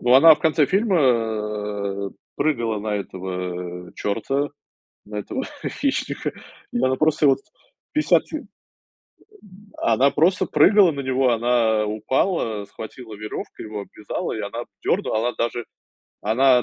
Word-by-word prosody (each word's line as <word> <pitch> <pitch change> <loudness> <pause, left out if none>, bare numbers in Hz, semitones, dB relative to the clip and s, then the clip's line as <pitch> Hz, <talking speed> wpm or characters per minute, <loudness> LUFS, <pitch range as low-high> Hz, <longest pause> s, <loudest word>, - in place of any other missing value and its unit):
Но 125 +1 +4
она 160 +4 +9
в - - -15
конце 155 -2 +3
фильма 105 - 0 0.3
прыгала 120 -8 0
на 105 0 -1
этого 90 -2 -5
чёрта, 135 +8 -1 0.6
на 105 0 -7
этого 105 - -4 0.2
хищника, - - -1 0.4
и - - -2
она 130 +2 +3
его 130 - 0
просто 155 0 +3
вот 135 - +4 0.5
50 305 0 +4
ки - - -5
М, - - -11 1.3
она 125 +5 +3
просто 165 +7 +3
прыгала 200 -5 +5
на 140 - -4
него, 130 -1 +2
она 115 -2 +2
упала, 110 - 0
схватила 110 +3 -9
верёвку, 105 +1 -7
его 105 -1 -5
обвязала, 105 +1 -5
и - - -3
она - - -4 0.2
дёрнула. 110 - +1
Она 120 +2 0
даже, 120 0 -1 0.6
она 125 +3 +4
115 Hz, 135 wpm, -23 LUFS, 105-140 Hz, 1.3 s, она